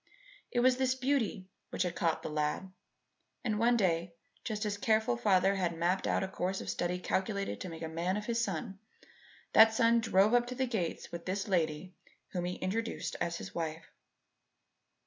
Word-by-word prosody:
It 240 - +1
was 255 0 +4
this 260 -1 +1
beauty 250 -7 0 0.2
which - - -1
had 180 -2 -3
caught 165 -2 0
the - - -3
lad; 150 +5 -2 0.7
and 215 -4 0
one 235 +1 +4
day, 170 -4 0 0.3
just 215 -2 -3
as 210 - 0
the 205 - -8
careful 220 - +2
father 185 +10 +3
had 175 -4 -1
mapped 180 +3 +1
out - - +1
a - - -1
course 190 0 -2
of - - -3
study 175 +1 -1
calculated 195 +2 -2
to 185 - -4
make 165 0 -7
a - - -2
man 170 +4 -1
of 210 - -4
his 235 0 0
son, 195 0 -4 0.7
that 220 0 +8
son 230 0 +4
drove 210 0 +3
up 240 0 +4
to 250 - -5
the 260 +1 +1
gates 215 -9 -3
with 170 0 -7
this 195 +3 -2
lady 175 -1 0 0.4
whom 175 -1 -3
he 180 +1 -2
introduced 225 +5 -3
as 170 0 -1
his - - -8
wife. 160 -1 -4
190 Hz, 190 wpm, -32 LUFS, 170-225 Hz, 0.7 s, that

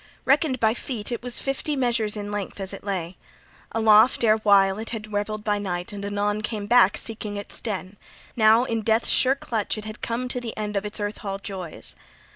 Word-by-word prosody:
Reckoned 275 -1 +2
by 220 -1 +3
feet, 235 -2 -5
it 235 - -3
was 245 0 -2
fifty 275 +2 -2
measures 235 -5 0
in 205 0 -5
length 205 -1 -4
as 195 0 -3
it 195 - -8
lay. 185 -3 -3 0.5
Aloft 220 +2 +5
erewhile 205 -3 +4
it 225 - -2
had 215 -2 -6
revelled 210 +1 -2
by 210 -1 0
night, 180 -2 -4
and 200 -1 -6
anon 205 +1 -1
come 215 -1 -3
back, 235 -2 +5
seeking 215 -2 -3
its 205 0 -4
den; 200 -2 -4 0.4
now 220 +1 +5
in 230 -3 -1
death's 220 +2 +2
sure 265 +1 +4
clutch 225 -6 -2
it 215 - -7
had 215 0 -8
come 235 +2 -2
to 250 - -2
the 230 -2 -6
end 210 -1 -3
of 200 +1 -1
its 210 - -4
earth 205 0 -3
hall 195 -3 -4
joys. 185 - -3
215 Hz, 205 wpm, -24 LUFS, 205-230 Hz, 0.5 s, Aloft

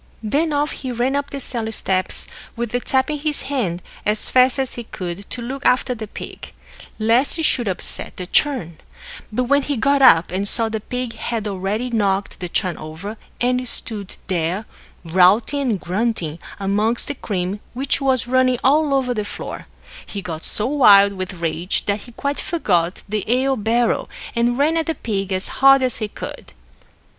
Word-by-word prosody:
Then 295 +9 +1
off 295 +1 0
he 260 - -5
ran 245 +3 0
up 285 0 -1
the 280 - -5
cellar 230 -4 0
steps, 185 -3 0 0.3
with 235 -1 -3
the 245 - 0
tap 265 +3 +1
in 300 - -3
his 300 0 -1
hand, 210 -11 -2 0.2
as 210 0 +2
fast 255 +1 +5
as 265 -2 0
he 240 - -6
could, 185 -1 -6
to 245 - -4
look 270 +3 -5
after 250 0 +3
the 220 -2 -7
pig, - - -9 0.4
lest 230 +8 +2
it 325 - -2
should 245 -6 +2
upset 185 - -3
the 180 - -4
churn; 180 - +1 0.5
but 250 +4 0
when 280 +3 +3
he 285 -1 -2
got 280 +4 +2
up, 170 -11 +6
and 195 +2 -1
saw 225 +1 +6
the 220 0 -2
pig 250 +2 -4
had 225 -1 -3
already 205 +5 -2
knocked 200 -3 0
the 180 -2 -5
churn 185 0 -1
over, 160 +8 -7 0.2
and 250 +1 +1
stood 210 -4 -3
there, 180 +3 -1 0.4
routing 190 - +4
and 210 -5 0
grunting 180 -4 -2 0.2
amongst 210 +4 0
the 285 - -2
cream 195 -5 -3 0.2
which 270 +2 0
was 260 -3 +2
running 255 0 +3
all 290 +1 +3
over 255 -2 +1
the 215 -3 -2
floor, 205 - -7 0.4
he 200 - -6
got 165 -4 -6
so 210 - 0
wild 205 -8 +6
with 185 -1 -5
rage 165 +2 -1
that 205 +1 0
he 240 - -13
quite 280 +4 -2
forgot 180 - 0
the 210 -1 -2
ale 265 +2 +2
barrel, 230 +1 +1 0.3
and 240 +1 +1
ran 305 +4 +2
at 325 - -1
the 325 - -1
pig 200 -6 -3
as 185 +1 -1
hard 270 0 +7
as 255 -2 0
he 215 - -2
could. - - -9
230 Hz, 185 wpm, -20 LUFS, 195-260 Hz, 0.5 s, hard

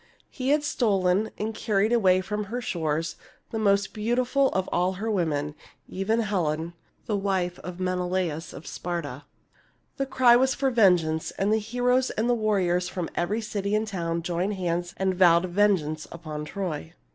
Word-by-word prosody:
He 260 0 -3
had 295 +1 +3
stolen 205 -7 +1
and 220 +1 -3
carried 215 0 +1
away 185 -5 +4
from 210 +2 -3
her 235 +5 -4
shores 165 -6 -2 0.3
the 225 - -2
most 200 -1 +2
beautiful 245 +5 +1
of 190 -6 -1
all 180 +1 +1
her 215 +4 -3
women, 150 -6 0 0.3
even 220 +5 0
Helen, 170 -6 -1 0.3
the 210 - -1
wife 190 -3 -1
of 180 0 -8
Menelaus 180 -3 -1
of 150 - -10
Sparta. 145 -6 -5 0.7
The 275 -1 -1
cry 250 -2 +5
was 260 +2 +3
for 270 -1 +1
vengeance; 175 -8 +3
and 200 +2 +2
heroes 245 +4 +1
and 220 +2 -1
warriors 190 -6 +1
from 180 -3 -4
every 205 +6 -1
city 205 -1 -2
and 215 +1 0
town 170 -4 -2
joined 180 +4 -1
hands 175 -1 -2
and 190 0 +1
vowed 175 -1 +5
vengeance 175 -5 +1
upon 155 -3 -6
Troy. 160 - -4
190 Hz, 155 wpm, -26 LUFS, 175-220 Hz, 0.7 s, cry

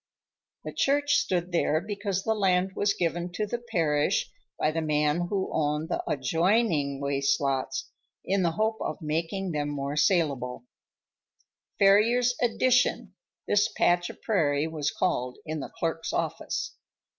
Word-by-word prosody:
The - - -6
church 285 +1 +2
stood 180 -1 -1
there 160 -2 +2
because 200 0 -3
the 220 - +1
land 190 -3 +2
was 205 0 +1
given 175 +1 -1
to 210 +4 -1
the 235 +3 -3
parish 165 -11 0 0.3
by 155 - +1
the 165 +1 -2
man 150 +2 +1
who 195 -2 -1
owned 150 +1 0
the - - -1
adjoining 160 - +1
waste 140 0 +1
lots, 135 -1 -1 0.4
in 195 +1 +1
the 170 -2 +1
hope 220 +4 0
of - - -3
making 165 +5 -2
them 145 -2 -2
more 140 0 -3
salable—"Farrier's 195 - 0
Addition," 250 +1 +2 0.3
this 205 0 +3
patch 175 0 +2
of - - -12
prairie 150 -8 +1
was 155 -2 -2
called 125 -9 -1
in 155 -1 -3
the - - -6
clerk's 165 0 -3
office. - - -2
170 Hz, 140 wpm, -27 LUFS, 150-200 Hz, 0.4 s, this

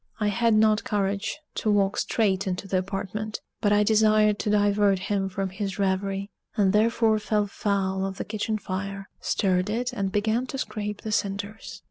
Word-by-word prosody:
I 210 -1 +2
had 230 +1 +2
not 215 0 +4
courage 205 -1 -1 0.2
to 215 - -1
walk 200 -1 +3
straight 200 -4 +1
into 185 +1 -3
the 185 -1 +1
apartment; 195 +3 -4 0.2
but 205 -2 +2
I 210 0 +5
desired 215 -1 +4
to - - -1
divert 205 -1 +3
him 195 0 -1
from 195 0 -3
his 195 0 -4
revery, 195 0 -1 0.3
and 195 -2 +3
therefore 220 0 +3
fell 210 0 +1
foul 195 -2 -1
of 195 0 -3
the - - -4
kitchen 215 0 -2
fire; 195 0 -5
stirred 185 -1 +1
it 245 +3 -1
and 195 -4 -2
began 220 +5 0
to 270 - -5
scrape 210 -5 -4
the 220 - -4
cinders. 205 +1 -3
205 Hz, 175 wpm, -26 LUFS, 195-215 Hz, 0.3 s, I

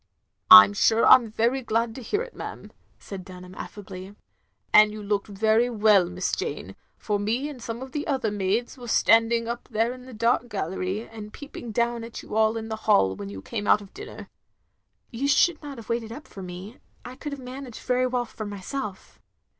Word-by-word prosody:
" - - -54
I 100 0 +13
'm 100 0 -3
sure 225 - +3
I - - +9
'm 240 -3 +5
very 235 +5 0
glad 230 -1 -1
to 260 - -9
hear 410 - -1
it, - - -12
ma'am," - - -8 0.3
said 195 -2 -9
Dunham, 180 -1 -11
affably, 190 0 -9 0.6
"and 215 0 +7
you 215 0 -8
looked 205 0 -1
very 220 +4 +2
well, 210 -5 +4
Miss 180 +1 -2
Jane, - - -4 0.2
for 205 -1 -2
me 230 +7 -1
and 280 -5 -9
some 230 +2 -5
of 265 - -10
the 295 +2 -4
other 265 -7 0
maids 205 +6 -1
was 240 -2 -5
standing 230 0 +3
up 235 +1 -5
there 225 +1 0
in 255 0 -12
the 260 - -10
dark 235 +2 +1
gallery, 190 +2 -3
and 215 -2 -10
peeping 265 -4 -9
down 235 +1 0
at 230 0 -8
you - - -7
all 220 +1 +3
in 225 0 -5
the 220 -1 -4
hall 95 - +4
when 100 +1 -7
you 95 -1 -9
came 210 -3 -4
out - - +5
of 200 -1 -14
dinner." 420 +2 -9 0.8
"You 260 +4 -2
should 345 +4 +3
not 285 -3 -8
have 230 - -11
waited 230 -1 -2
up 265 +3 -9
for 195 - -10
me. 185 +5 -9 0.3
I 250 - -8
could 295 +2 -7
have 280 - -6
managed 255 -1 -9
very 255 0 +1
well 250 -1 -1
for 220 -2 -7
myself." 205 +1 -6
225 Hz, 210 wpm, -25 LUFS, 205-245 Hz, 0.8 s, I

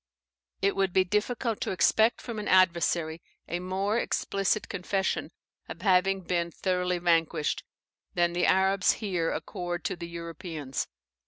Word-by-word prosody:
It 200 - +3
would 195 -2 +1
be 190 - +5
difficult 215 +4 -1
to - - -1
expect 220 +4 +3
from 235 -3 -5
an 210 - -4
adversary 170 -3 +3 0.3
a 175 - -2
more 195 +5 0
explicit 200 -1 0
confession 190 +1 -1 0.4
of - - -8
having 195 0 +3
been 170 -1 -1
thoroughly 180 +1 -1
vanquished, 165 -3 +1 0.5
than 175 -1 +2
the 175 0 +2
Arabs 190 0 +4
here 180 -7 -1
accord 175 -1 -4
to - - -1
the 170 -1 -7
Europeans. 165 -4 -5
180 Hz, 140 wpm, -28 LUFS, 170-195 Hz, 0.5 s, be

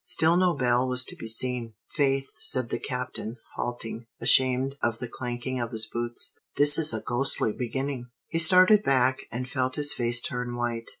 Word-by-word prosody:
Still 165 +1 +2
no 180 -2 +2
bell 125 -1 +1
was 125 0 +3
to - - -4
be 115 - -9
seen. 115 0 -1 0.2
"Faith," 135 -2 0
said 130 - +1
the - - -2
Captain, 125 -2 -6 0.2
halting, 115 -1 -6
ashamed 130 +1 +3
of 115 -1 -1
the 125 - -6
clanking 125 +1 -5
of 120 - -4
his 110 -2 -2
boots, 120 +1 0 0.2
"this 145 +1 +7
is 155 -1 +5
a 110 -1 -4
ghostly 120 -3 0
beginning!" 130 0 -5 0.2
He 165 - -2
started 185 +5 +6
back, 130 -4 0
and 125 +2 -5
felt 130 -1 -2
his 145 0 -1
face 120 0 0
turn 125 -1 -4
white. 120 -1 -4
125 Hz, 180 wpm, -26 LUFS, 120-135 Hz, 0.2 s, this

